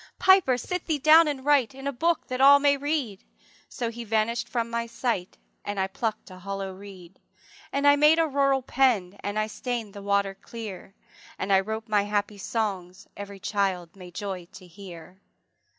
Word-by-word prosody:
``Piper, 370 Hz, -10 st, +5 dB
sit 360 Hz, +7 st, -4 dB
thee 315 Hz, -3 st, +1 dB
down 310 Hz, +3 st, +6 dB
and 280 Hz, -3 st, -4 dB
write 275 Hz, -5 st, +3 dB
In 270 Hz, 0 st, -10 dB
a 280 Hz, -, 0 dB
book, 335 Hz, +6 st, 0 dB
that 255 Hz, 0 st, -3 dB
all 280 Hz, +1 st, +9 dB
may 285 Hz, 0 st, +3 dB
read.'' 280 Hz, -8 st, -3 dB, 0.5 s
So 235 Hz, -2 st, -4 dB
he 235 Hz, +1 st, -7 dB
vanish'd 225 Hz, +1 st, -1 dB
from 235 Hz, -2 st, -1 dB
my 235 Hz, 0 st, -2 dB
sight, 230 Hz, -6 st, -3 dB, 0.3 s
And 205 Hz, -1 st, -4 dB
I 190 Hz, -, +2 dB
pluck'd 210 Hz, +1 st, -4 dB
a 185 Hz, -, -11 dB
hollow 195 Hz, 0 st, -5 dB
reed, 190 Hz, -2 st, -13 dB, 0.5 s
And 280 Hz, +1 st, -1 dB
I 285 Hz, 0 st, +7 dB
made 300 Hz, +2 st, +5 dB
a 330 Hz, -1 st, +3 dB
rural 275 Hz, -2 st, +1 dB
pen, 225 Hz, -9 st, +1 dB
And 205 Hz, +1 st, -4 dB
I 215 Hz, -, +1 dB
stain'd 230 Hz, -1 st, -5 dB
the 200 Hz, -, -9 dB
water 200 Hz, 0 st, 0 dB
clear, 195 Hz, -2 st, -9 dB, 0.4 s
And 195 Hz, +1 st, -1 dB
I 190 Hz, -, +6 dB
wrote 220 Hz, +3 st, -4 dB
my 210 Hz, -2 st, +2 dB
happy 205 Hz, 0 st, -2 dB
songs, 190 Hz, -4 st, -4 dB
Every 200 Hz, -1 st, -8 dB
child 190 Hz, -4 st, -2 dB
may 180 Hz, -2 st, -11 dB
joy 180 Hz, -1 st, -6 dB
to 185 Hz, -, -12 dB
hear. 180 Hz, 0 st, -12 dB
215 Hz, 185 wpm, -26 LUFS, 195-270 Hz, 0.5 s, all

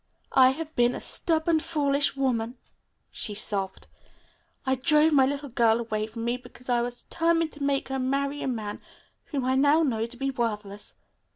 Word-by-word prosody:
"I 260 Hz, -1 st, +7 dB
have 315 Hz, +4 st, -5 dB
been 240 Hz, 0 st, +3 dB
a -, -, -4 dB
stubborn, 320 Hz, 0 st, +2 dB
foolish 285 Hz, -3 st, 0 dB
woman," 245 Hz, -3 st, -1 dB, 0.5 s
she 210 Hz, -, -5 dB
sobbed. 200 Hz, -2 st, -1 dB, 0.8 s
"I 265 Hz, -, +2 dB
drove 300 Hz, +4 st, +4 dB
my 270 Hz, -2 st, +5 dB
little 285 Hz, 0 st, -3 dB
girl 230 Hz, -2 st, +3 dB
away 215 Hz, -2 st, -2 dB
from 225 Hz, +1 st, -6 dB
me 240 Hz, +1 st, 0 dB
because 250 Hz, 0 st, -15 dB
I 240 Hz, -1 st, +3 dB
was 245 Hz, 0 st, -5 dB
determined 330 Hz, -1 st, +1 dB
to 290 Hz, -, -8 dB
make 275 Hz, -1 st, 0 dB
her 265 Hz, 0 st, -2 dB
marry 275 Hz, +2 st, -1 dB
a -, -, -2 dB
man 220 Hz, -5 st, -4 dB, 0.4 s
whom 275 Hz, -4 st, -3 dB
I 260 Hz, -, +2 dB
now 285 Hz, +4 st, +4 dB
know 230 Hz, -6 st, 0 dB
to 245 Hz, +1 st, -13 dB
be 270 Hz, +2 st, -1 dB
worthless. 210 Hz, -4 st, -4 dB
260 Hz, 180 wpm, -26 LUFS, 235-285 Hz, 0.8 s, I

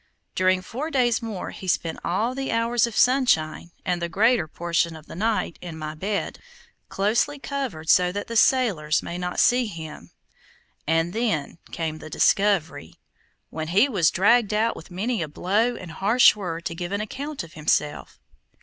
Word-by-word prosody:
During 185 Hz, 0 st, +2 dB
four 270 Hz, +11 st, -5 dB
days 250 Hz, -5 st, +2 dB
more 220 Hz, -5 st, -5 dB
he 190 Hz, -, -9 dB
spent 165 Hz, -2 st, -1 dB
all 220 Hz, +8 st, 0 dB
the 270 Hz, +1 st, -3 dB
hours 230 Hz, +1 st, +2 dB
of 230 Hz, -, -7 dB
sunshine, 245 Hz, -, +2 dB, 0.2 s
and 175 Hz, -1 st, -1 dB
the 170 Hz, -, -2 dB
greater 225 Hz, -1 st, +2 dB
portion 170 Hz, +1 st, -1 dB
of 155 Hz, -1 st, -12 dB
the -, -, -11 dB
night, 210 Hz, -2 st, -1 dB
in 170 Hz, -3 st, -7 dB
my 155 Hz, -1 st, -5 dB
bed, 200 Hz, +6 st, -3 dB, 0.5 s
closely 225 Hz, +9 st, 0 dB
covered 270 Hz, -, -5 dB
so 180 Hz, +1 st, +4 dB
that 205 Hz, +2 st, -4 dB
the 230 Hz, -, -6 dB
sailors 200 Hz, -, +3 dB
might 170 Hz, -, -5 dB
not 180 Hz, 0 st, -3 dB
see 245 Hz, -1 st, +4 dB
him, 160 Hz, -6 st, -9 dB, 0.8 s
and 165 Hz, +2 st, +1 dB
then 215 Hz, -9 st, -2 dB
came 160 Hz, -2 st, -3 dB
the 155 Hz, -, -10 dB
discovery, 165 Hz, -, +1 dB, 0.6 s
when 160 Hz, 0 st, -4 dB
he 200 Hz, -, +4 dB
was 190 Hz, -, +2 dB
dragged 210 Hz, +2 st, +3 dB
out 225 Hz, +2 st, +1 dB
with 160 Hz, -, -11 dB
many 205 Hz, +4 st, -2 dB
a 160 Hz, -, -2 dB
blow 210 Hz, +10 st, 0 dB
and 185 Hz, -7 st, -9 dB
harsh 215 Hz, +9 st, +5 dB
word 170 Hz, -5 st, -5 dB
to -, -, -2 dB
give 175 Hz, +2 st, -5 dB
an 200 Hz, +1 st, -1 dB
account 275 Hz, -, -5 dB
of 165 Hz, -, -13 dB
himself. 150 Hz, -1 st, -1 dB
190 Hz, 175 wpm, -24 LUFS, 165-230 Hz, 0.8 s, harsh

